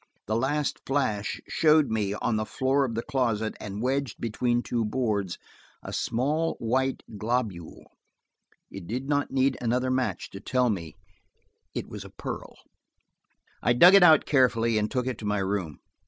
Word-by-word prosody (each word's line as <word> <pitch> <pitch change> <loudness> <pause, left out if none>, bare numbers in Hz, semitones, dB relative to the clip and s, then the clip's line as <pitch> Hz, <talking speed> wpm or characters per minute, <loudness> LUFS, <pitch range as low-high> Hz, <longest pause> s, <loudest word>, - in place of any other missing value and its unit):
The 110 - -1
last 140 +4 0
flash 120 -7 -1
showed 155 -4 +3
me, 105 -2 -1
on 110 - -1
the 110 - 0
floor 135 +1 +1
of 115 -3 -4
the 115 - -2
closet 115 -6 -1
and 105 +1 -5
wedged 135 -2 -1
between 120 +2 0
two 120 -2 -1
boards, 105 -5 -1 0.5
a - - -7
small 150 +7 0
white 130 +3 -1 0.2
globule. 110 -7 -3 0.9
It 95 -3 -9
did 125 +5 -4
not 145 -1 0
need 135 0 +1
another 125 +2 0
match 130 0 -2
to 100 - -8
tell 125 +2 +1
me 85 -5 -5 0.8
it - - -3
was - - -8
a - - -11
pearl. - - -7 1.1
I 120 - +3
dug 175 +10 +8
it 200 - +8
out 160 -4 +7
carefully 115 -5 +3
and 105 0 -1
took 125 -2 -1
it 130 -3 -3
to 110 - -7
my 105 0 0
room. 95 -5 -2
120 Hz, 165 wpm, -27 LUFS, 105-135 Hz, 1.1 s, dug